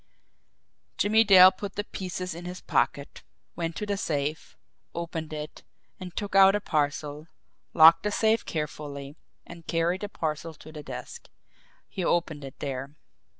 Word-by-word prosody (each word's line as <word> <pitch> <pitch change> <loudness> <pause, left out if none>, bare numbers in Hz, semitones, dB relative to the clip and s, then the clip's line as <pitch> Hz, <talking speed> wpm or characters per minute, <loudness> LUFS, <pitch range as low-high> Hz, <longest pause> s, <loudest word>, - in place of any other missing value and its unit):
Jimmie 220 +2 +4
Dale 190 -3 +9
put 195 +1 -7
the 205 - -2
pieces 185 -3 -5
in 170 +2 -9
his 180 +1 -6
pocket, 140 -1 -1 0.3
went 165 -1 -3
to 210 - -4
the 200 -1 -2
safe, 150 -3 -3 0.4
opened 165 -2 -5
it, 150 0 -7 0.4
and 180 -2 -9
took 205 -2 -4
out 195 0 +7
a - - +1
parcel, 150 -2 -2 0.5
locked 165 +1 +8
the 210 - -1
safe 220 +2 +2
carefully, 145 -2 -5 0.3
and 170 -1 -12
carried 170 +3 0
the 205 - -4
parcel 160 -2 -4
to 155 - -13
the 155 -1 -8
desk. 470 - -9 0.6
He 190 - -5
opened 165 -4 0
it 135 -1 -9
there. 135 +1 -5
165 Hz, 150 wpm, -27 LUFS, 150-190 Hz, 0.6 s, Dale